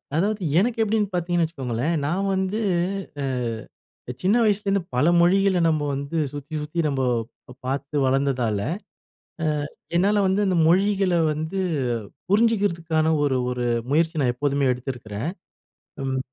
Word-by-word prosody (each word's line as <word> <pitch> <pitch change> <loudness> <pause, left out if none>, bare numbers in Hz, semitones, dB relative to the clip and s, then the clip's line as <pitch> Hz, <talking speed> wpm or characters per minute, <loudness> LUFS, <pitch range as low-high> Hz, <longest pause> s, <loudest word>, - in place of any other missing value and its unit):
அதாவது 205 +5 0 0.2
எனக்கு 230 +3 0
எப்டின்னு 215 -2 +1
பார்த்திங்கன்னு 175 -1 +1
வச்சுக்கோங்களேன். 135 -1 -2
நான் 185 +7 0
வந்து 190 +3 -1 0.6
அ - - 0 1.0
சின்ன 200 +6 +3
வயசுலேருந்து 200 -2 +2
பல 125 +4 +3
மொழிகள 190 +2 +4
நம்ம 155 -2 +1
வந்து 140 +4 -4
சுத்தி 145 +2 -8
சுத்தி 150 +3 -4
நம்ம 135 -2 -1 0.6
பார்த்து 140 +2 -2
வளர்ந்ததால, 130 -5 +1 0.9
அ - - +1 0.5
என்னால 200 +3 +3
வந்து 190 +2 +2
அந்த 185 -2 +1
மொழிகள 195 0 +3 0.2
வந்து 160 +5 -4 0.7
புரிஞ்சிக்கிறதுக்கான, 195 -8 +2 0.2
ஒரு 135 -2 +1
ஒரு 125 -1 -2 0.2
முயற்சி 160 +1 +2
நான் 125 -2 +2
எப்போதுமே 140 0 +1
எடுத்திருக்கிறன். 120 0 -5 0.7
ம் 130 -1 -1
165 Hz, 120 wpm, -24 LUFS, 140-195 Hz, 1.0 s, மொழிகள